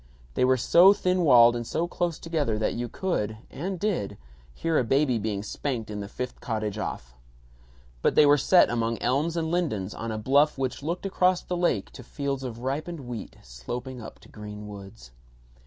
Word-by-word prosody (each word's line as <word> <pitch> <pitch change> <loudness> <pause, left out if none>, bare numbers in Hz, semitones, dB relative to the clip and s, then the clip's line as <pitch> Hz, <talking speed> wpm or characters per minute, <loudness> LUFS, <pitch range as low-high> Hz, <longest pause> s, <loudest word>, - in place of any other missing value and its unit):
They - - +1
were 130 0 +4
so 175 +10 +6
thin 185 -2 0
walled 120 -6 +7
and 120 -1 -4
so 165 +6 -1
close 175 -2 -2
together 150 -10 -1
that 110 - 0
you 120 0 -4
could 110 - -2
and 180 +6 -4
did 165 - -2 0.3
hear 160 - 0
a - - +2
baby 135 0 +2
being 105 -1 -2
spanked 115 -1 -4
in 105 - -4
the 100 - -5
fifth 125 +4 -6
cottage 110 -2 -3
off. - - -5 0.9
But - - +2
they 150 - +7
were 145 0 +6
set 180 -2 +5
among 115 -1 0
elms 145 +7 0
and 160 -1 -1
lindens 110 - -1
on 115 0 -5
a 110 - -3
bluff 140 +8 +3
which 130 0 -2
looked 170 +6 -3
across 185 -2 +2
the 180 - -3
lake 175 - 0
to - - -11
fields 140 +1 -3
of 120 -2 -6
ripened 150 +5 -3
wheat 120 -3 -7
sloping 120 - -7
up - - -10
to - - -16
green 105 0 -9
woods. 95 -12 -11
125 Hz, 190 wpm, -26 LUFS, 110-165 Hz, 0.9 s, walled